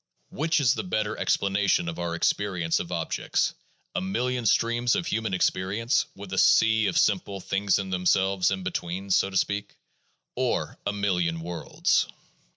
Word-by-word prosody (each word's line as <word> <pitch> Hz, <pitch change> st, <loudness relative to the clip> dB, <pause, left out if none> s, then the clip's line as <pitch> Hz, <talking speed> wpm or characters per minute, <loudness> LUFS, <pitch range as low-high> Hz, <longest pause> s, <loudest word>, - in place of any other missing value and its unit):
Which 160 Hz, +2 st, +1 dB
is 130 Hz, -4 st, +4 dB
the -, -, -3 dB
better 110 Hz, -, -1 dB
explanation 100 Hz, -3 st, +1 dB
of 85 Hz, 0 st, -5 dB
our 85 Hz, -1 st, -2 dB
experience 85 Hz, -2 st, 0 dB
of 85 Hz, -, -6 dB
objects 85 Hz, -2 st, -1 dB, 0.2 s
— -, -, -43 dB
a 195 Hz, -, 0 dB
million 125 Hz, -, -1 dB
streams 120 Hz, +3 st, +2 dB
of -, -, -1 dB
human 110 Hz, -8 st, -1 dB
experience, 100 Hz, +6 st, 0 dB
with 95 Hz, -1 st, -9 dB
a 95 Hz, -, +1 dB
sea 110 Hz, -1 st, +4 dB
of -, -, 0 dB
simple 100 Hz, 0 st, +1 dB
things 100 Hz, +1 st, +1 dB
in 95 Hz, -1 st, -4 dB
themselves 95 Hz, +1 st, +2 dB
in 95 Hz, -1 st, -3 dB
between 95 Hz, +3 st, -4 dB
(so 95 Hz, -, +3 dB
to 95 Hz, -, -2 dB
speak), 100 Hz, +2 st, -1 dB, 0.6 s
or -, -, -1 dB
a -, -, +2 dB
million 90 Hz, -5 st, 0 dB
worlds 85 Hz, 0 st, 0 dB
100 Hz, 160 wpm, -26 LUFS, 90-110 Hz, 0.6 s, is